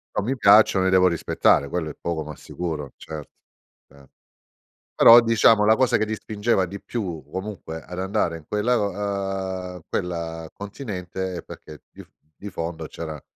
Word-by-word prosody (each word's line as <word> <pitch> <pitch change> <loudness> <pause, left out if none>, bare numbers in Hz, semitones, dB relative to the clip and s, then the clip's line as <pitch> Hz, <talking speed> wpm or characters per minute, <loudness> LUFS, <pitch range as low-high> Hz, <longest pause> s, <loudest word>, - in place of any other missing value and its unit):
Non 100 - 0
mi 130 +4 0
piacciono, 100 -3 +6
li 95 - +2
devo 95 0 +5
rispettare, 80 -4 +2
quello 80 -2 -2
è - - -9
poco 85 -2 -3
ma 75 -1 -8
sicuro, 80 -6 -5
certo. 75 -2 -9 0.6
Eh. 70 -1 -19 0.9
Però, 115 +1 +9
diciamo 115 -2 +4
la 110 +1 +5
cosa 130 -1 +3
che 110 - 0
ti 110 - -2
spingeva 105 -1 0
di 100 +3 -8
più 90 -10 -5
comunque 95 -5 -6
ad 90 0 -9
andare 95 -3 -1
in 75 - -18
quella 105 +4 +1
lo 100 -4 0 0.8
ehm, - - -11
quella 85 -2 -4
continente 95 -4 -5
è - - -6
perché 75 -3 -12
di - - -12
f - - -22 0.3
di 105 - -7
fondo 80 -2 -5
c'era 80 -3 -7
90 Hz, 170 wpm, -23 LUFS, 80-105 Hz, 0.9 s, Però